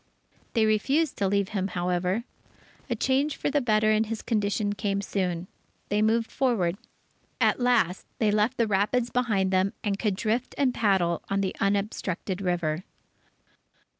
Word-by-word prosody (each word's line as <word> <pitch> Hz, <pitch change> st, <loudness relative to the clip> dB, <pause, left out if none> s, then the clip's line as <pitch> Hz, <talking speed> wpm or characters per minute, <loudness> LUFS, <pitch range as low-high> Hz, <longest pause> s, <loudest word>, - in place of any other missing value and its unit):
They 225 Hz, -2 st, +3 dB
refused 265 Hz, +8 st, +1 dB
to 200 Hz, -, +2 dB
leave 200 Hz, 0 st, +1 dB
him, 195 Hz, -3 st, -1 dB
however. 180 Hz, +3 st, -1 dB, 0.7 s
A 240 Hz, -, 0 dB
change 270 Hz, +5 st, +1 dB
for -, -, -1 dB
the 290 Hz, 0 st, +2 dB
better 215 Hz, -3 st, +3 dB
in 215 Hz, +1 st, +3 dB
his 220 Hz, 0 st, -5 dB
condition 205 Hz, -2 st, 0 dB
came 200 Hz, -1 st, -1 dB
soon. 185 Hz, -3 st, -2 dB, 0.4 s
They 205 Hz, +1 st, +1 dB
moved 225 Hz, +1 st, +2 dB
forward. 215 Hz, -10 st, +1 dB, 0.6 s
At -, -, +3 dB
last 245 Hz, -8 st, +2 dB
they 215 Hz, -2 st, +2 dB
left 215 Hz, +5 st, +1 dB
the 230 Hz, -, +3 dB
rapids 215 Hz, +4 st, +1 dB
behind 210 Hz, -7 st, +1 dB
them, 190 Hz, +2 st, +2 dB
and 200 Hz, -2 st, -1 dB
could 210 Hz, -4 st, 0 dB
drift 225 Hz, +5 st, -1 dB
and 265 Hz, -3 st, +2 dB
paddle 190 Hz, -7 st, +1 dB
on 195 Hz, 0 st, +1 dB
the 190 Hz, -, -2 dB
unobstructed 200 Hz, -2 st, -1 dB
river. 175 Hz, -3 st, -1 dB
205 Hz, 155 wpm, -27 LUFS, 190-230 Hz, 0.7 s, They